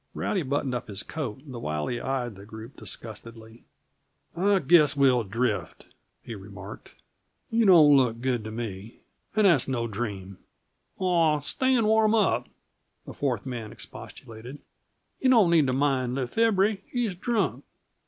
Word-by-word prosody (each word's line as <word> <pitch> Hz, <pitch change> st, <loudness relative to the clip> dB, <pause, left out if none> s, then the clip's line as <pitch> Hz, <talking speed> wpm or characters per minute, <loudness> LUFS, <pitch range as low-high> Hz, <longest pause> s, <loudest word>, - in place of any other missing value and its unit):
Rowdy 190 Hz, -, -1 dB
buttoned 140 Hz, -2 st, -2 dB
up 125 Hz, 0 st, -4 dB
his 100 Hz, -1 st, -5 dB
coat 135 Hz, -5 st, -6 dB
the 130 Hz, -5 st, -8 dB
while 75 Hz, -8 st, -3 dB
he 120 Hz, -, -3 dB
eyed 125 Hz, -3 st, -2 dB
the 100 Hz, 0 st, -13 dB
group 110 Hz, +4 st, -11 dB
disgustedly. 115 Hz, 0 st, -8 dB, 0.7 s
"I 195 Hz, +3 st, +3 dB
guess 155 Hz, -3 st, +4 dB
we'll 130 Hz, -4 st, +4 dB
drift," 110 Hz, +2 st, -3 dB, 0.3 s
he 115 Hz, -, -7 dB
remarked. 100 Hz, 0 st, -11 dB, 0.6 s
"You 225 Hz, -1 st, +3 dB
don't 155 Hz, -6 st, +7 dB
look 125 Hz, -4 st, +2 dB
good 125 Hz, -2 st, -1 dB
to 110 Hz, -, -6 dB
me, 110 Hz, -2 st, -7 dB, 0.3 s
and 215 Hz, -1 st, +3 dB
that's 165 Hz, -10 st, +4 dB
no 120 Hz, -3 st, -1 dB
dream." 100 Hz, -4 st, -5 dB, 0.6 s
"Aw, 165 Hz, -5 st, +2 dB
stay 260 Hz, -, 0 dB
and 230 Hz, -3 st, +2 dB
warm 220 Hz, 0 st, +3 dB
up," 155 Hz, -, +1 dB, 0.6 s
the -, -, -9 dB
fourth 130 Hz, -6 st, -2 dB
man 120 Hz, -5 st, -6 dB
expostulated. 115 Hz, +5 st, -10 dB, 0.6 s
"Yuh 260 Hz, -, +2 dB
don't 220 Hz, -9 st, +5 dB
need 160 Hz, -5 st, +4 dB
t' -, -, +1 dB
mind 130 Hz, -2 st, 0 dB
Le 135 Hz, -2 st, -1 dB
Febre; 210 Hz, -, +2 dB
he's 240 Hz, -5 st, -1 dB
drunk." 180 Hz, -, -1 dB
130 Hz, 155 wpm, -26 LUFS, 115-175 Hz, 0.7 s, don't